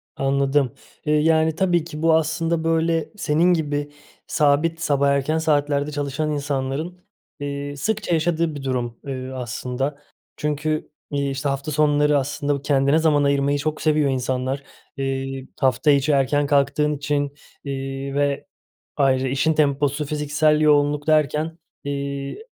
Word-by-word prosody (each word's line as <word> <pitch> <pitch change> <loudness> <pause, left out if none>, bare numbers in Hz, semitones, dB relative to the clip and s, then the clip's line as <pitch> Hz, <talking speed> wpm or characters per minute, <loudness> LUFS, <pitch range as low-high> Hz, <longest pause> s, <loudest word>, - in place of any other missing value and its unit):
Anladım, 135 -1 +1 0.3
eee, 150 - +2
yani 160 +1 +3
tabii 175 -3 +2
ki 155 -2 -8
bu 165 0 +4
aslında 160 +1 0
böyle 165 0 +1
senin 170 +2 +3
gibi 145 -2 -2 0.4
sabit 155 +2 +2
sabah 140 -2 +2
erken 140 +3 +1
saatlerde 145 -2 +1
çalışan 145 +1 -2
insanların, 145 +4 -3 0.4
eee, 145 0 -4
sıkça 205 +4 -1
yaşadığı 165 -1 +1
bir 140 - -7
durum, 120 -3 -2
ııı, 130 -1 -5
aslında. 125 +3 -3 0.4
Çünkü, 150 +1 -2 0.2
iii, 140 -1 0
işte 135 +1 -2
hafta 140 +2 -3
sonları 150 0 +3
aslında 145 +1 -1
bu 140 - -6
kendine 140 +1 +3
zaman 150 -3 +3
ayırmayı 140 0 +2
çok 155 +2 -3
seviyor 150 -2 +2
insanlar. 130 +1 -1 0.3
Eee, 135 0 -3
hafta 135 +3 +3
içi 140 +2 +3
erken 145 +1 +2
kalktığın 150 +1 +2
için, 145 -1 -1 0.3
iii, 135 0 -4
ve 145 -1 0 0.5
ayrı 130 -1 +2
işin 140 +5 +1
temposu, 145 0 +1
fiziksel 150 +1 +1
yoğunluk 145 -1 +3
derken, 155 +1 +1 0.3
iii, 140 - -4
145 Hz, 135 wpm, -22 LUFS, 140-155 Hz, 0.5 s, bu